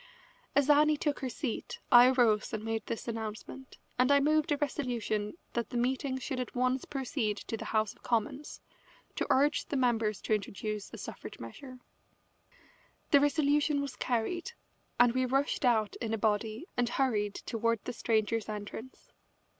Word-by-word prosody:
As 285 -1 +4
Annie 300 +1 +5
took 290 -1 -1
her 260 - -3
seat 250 -2 -4
I 245 +1 +9
arose 240 -4 +3
and 215 -1 -3
made 225 0 -2
this 230 - -4
announcement, 225 +3 -6 0.2
and 255 +2 +4
I 280 - +6
moved 310 +2 +2
a 290 - +3
resolution 240 -7 -2 0.2
that 235 -2 -2
the 245 - -3
meeting 260 +2 0
should 260 0 -4
at 250 - -5
once 255 +1 +1
proceed 255 -6 -2
to 225 - -5
the - - -6
House 215 -2 0
of - - -26
Commons 240 +5 -2 0.5
to - - -1
urge 285 +3 +3
the 285 - -1
members 225 -5 +1
to - - 0
introduce 210 0 -3
a - - -8
suffrage - - -8
measure. 260 -3 -9 1.3
The 285 - +8
resolution 290 0 +2
was 280 -2 -4
carried, 345 - -2 0.5
and 245 -1 +6
we 255 0 +1
rushed 270 +3 0
out 220 -5 +2
in 225 -2 -2
a - - -4
body 215 +5 0
and 245 -1 +1
hurried 215 -7 0
toward 230 -1 -1
the 250 - -3
Strangers' 225 -1 0
Entrance. 215 +4 -8
245 Hz, 165 wpm, -31 LUFS, 220-280 Hz, 1.3 s, I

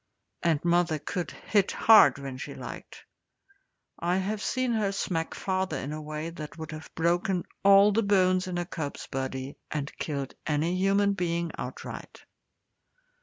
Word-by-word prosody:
And 165 -2 +1
mother 170 -2 +3
could 175 +4 -4
hit 200 -3 0
hard 210 - +7
when 135 -2 -6
she - - -7
liked. - - -9 0.9
I 175 +2 +1
have 200 +2 -2
seen 255 +2 0
her 215 -4 +1
smack 165 -4 -2
father 190 -1 -1
in 145 +3 -4
a 155 - -5
way 155 +2 -5
that 155 -1 -8
would 160 -1 -7
have 155 0 -8
broken 175 +2 +1 0.2
all 200 +1 +7
the 220 +3 +2
bones 185 -2 +3
in 180 -1 -3
a 175 - -1
cub's 155 -5 -5
body, 130 +1 -4
and 145 -1 -4
killed 140 -3 -3
any 160 +4 +1
human 200 +2 +3
being 170 -2 -1
outright. - - -7
175 Hz, 155 wpm, -28 LUFS, 155-195 Hz, 0.9 s, hard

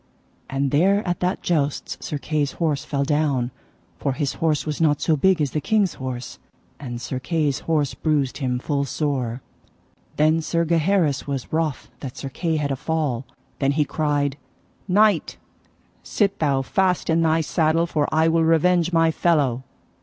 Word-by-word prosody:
And 135 0 -1
there 195 +7 +3
at 175 -1 -1
that 180 +2 -1
jousts 150 -5 -1
Sir 150 - -4
Kay's 145 -1 -1
horse 155 -5 -1
fell 140 -1 -1
down, 140 -4 0 0.5
for 140 - -1
his 140 0 -2
horse 155 -3 +1
was 150 +1 -3
not 150 -3 +3
so 160 - +2
big 185 +4 +3
as 145 -4 0
the 150 - -2
king's 205 +1 +1
horse, 130 -2 -6 0.4
and 120 -4 -6
Sir 130 +2 -4
Kay's 150 -1 0
horse 150 -4 +1
bruised 145 -4 0
him 125 -3 -1
full 140 +2 -1
sore. 130 -4 -2 0.7
Then 155 +2 +3
Sir 170 +1 0
Gaheris 165 -3 +1
was 140 -1 -4
wroth 155 -7 -1
that 130 -2 -7
Sir 135 - -5
Kay 165 +4 -2
had 145 -2 -1
a - - 0
fall. 140 -4 -2 0.3
Then 140 0 +2
he 150 0 +2
cried: 145 -3 -1 0.5
Knight, 210 +2 +3 0.6
sit 200 -2 0
thou 140 -4 +1
fast 185 +5 +1
in 165 0 +2
thy 160 0 +3
saddle, 160 +1 +1
for 150 -4 0
I 160 +1 +3
will 165 0 +3
revenge 170 +2 +3
my 165 -1 +3
fellow. 145 -8 +1
150 Hz, 170 wpm, -23 LUFS, 140-165 Hz, 0.7 s, there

